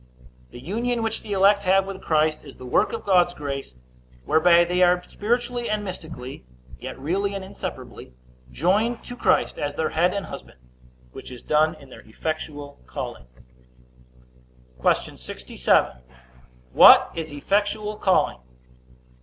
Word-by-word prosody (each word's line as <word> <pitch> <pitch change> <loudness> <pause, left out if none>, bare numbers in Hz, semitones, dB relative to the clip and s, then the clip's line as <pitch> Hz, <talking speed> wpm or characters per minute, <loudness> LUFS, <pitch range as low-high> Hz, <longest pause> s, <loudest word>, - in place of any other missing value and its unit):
The - - -11
union 230 - -2
which 225 0 -2
the 210 - -10
elect 200 +1 +4
have 195 0 +3
with 195 -1 -7
Christ 155 -1 +1
is 140 - -13
the 130 - -10
work 200 +11 +2
of - - -6
God's 180 -2 +3
grace, 140 - -6 0.5
whereby 170 +2 +5
they 180 +1 0
are 180 0 +4
spiritually 240 +2 -2
and 215 -1 -1
mystically, 160 - -8 0.4
yet - - -7
really 195 +8 -2
and 195 - -5
inseparably, 190 - -8 0.4
joined 215 - 0
to 245 - -8
Christ - - +1
as 145 0 -3
their 160 - -1
head 175 +3 +2
and 200 0 -4
husband; - - -10 0.5
which - - -10
is 125 - -10
done 155 +1 +2
in 135 -2 -16
their - - -12
effectual 145 +3 -6
calling. 60 0 -7 1.5
Q. - - +1
67. 60 0 0 0.7
What - - +8
is 160 -2 -5
effectual 205 +7 -1
calling? 190 -3 +1
180 Hz, 140 wpm, -24 LUFS, 145-205 Hz, 1.5 s, What